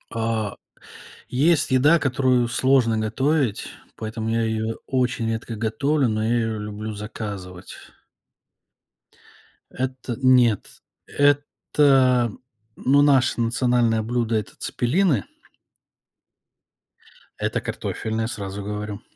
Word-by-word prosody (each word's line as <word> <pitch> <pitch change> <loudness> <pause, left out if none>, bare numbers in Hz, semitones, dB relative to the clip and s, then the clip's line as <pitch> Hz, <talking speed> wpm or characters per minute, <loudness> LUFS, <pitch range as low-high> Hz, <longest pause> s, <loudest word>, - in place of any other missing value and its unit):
А, 110 -2 -1 0.7
есть 150 +5 +2
еда, 145 +6 +5
которую 130 -3 +2
сложно 125 -2 +2
готовить, 125 +2 0 0.3
поэтому 110 0 -4
я 115 0 +1
её 110 0 -2
очень 125 -2 0
редко 115 +1 -4
готовлю, 135 +6 0
но 110 -1 -1
я 115 +2 +1
её 115 -2 -1
люблю 105 +1 -6
заказывать. 100 -3 -7 2.0
Это 130 -2 -4
нет, 125 -5 +3 0.2
это, 140 -3 +2 0.4
ну, 140 +2 +3
наше 135 -4 +3
национальное 120 -1 +1
блюдо- 115 0 -1
это 105 -2 -3
цеппелины. 140 - 0 2.1
Это - - -1
картофельное, 110 0 -3
сразу 100 -5 -6
говорю. 105 +1 -5
115 Hz, 95 wpm, -23 LUFS, 110-130 Hz, 2.1 s, еда